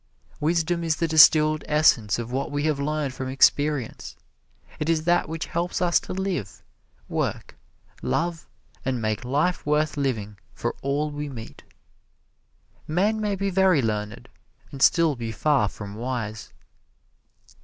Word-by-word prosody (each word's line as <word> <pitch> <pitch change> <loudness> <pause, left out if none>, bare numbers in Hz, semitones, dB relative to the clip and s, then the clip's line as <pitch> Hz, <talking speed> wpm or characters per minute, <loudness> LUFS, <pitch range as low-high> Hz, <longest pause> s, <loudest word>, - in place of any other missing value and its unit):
Wisdom 170 +2 0
is 160 -2 +1
the 165 - -1
distilled 155 -1 +6
essence 150 -9 +3
of 120 0 -5
what 135 +4 -2
we 145 0 -2
have 150 -2 0
learned 145 -1 -2
from 130 0 -5
experience. 140 -1 +1 0.6
It 150 - -2
is 160 -1 +1
that 175 -1 +2
which 160 0 -4
helps 170 +1 -2
us 175 -1 +3
to - - -7
live, 185 - -4 0.4
work, - - -3 0.5
love 170 -1 -2 0.4
and 130 -2 -1
make 110 +1 -2
life 150 +8 0
worth 150 +1 0
living 110 -8 -2 0.2
for 120 - -2
all 145 +2 -1
we 145 0 -5
meet. 115 -4 -9 1.3
Men 205 +7 +1
may 205 -1 0
be 195 +1 -2
very 185 -6 +3
learned, 105 -2 -3 0.4
and 135 - -8
still 165 -1 +4
be 115 -2 -5
far 140 -2 +2
from 100 -1 -9
wise. 110 -2 -5
150 Hz, 145 wpm, -24 LUFS, 125-165 Hz, 1.3 s, distilled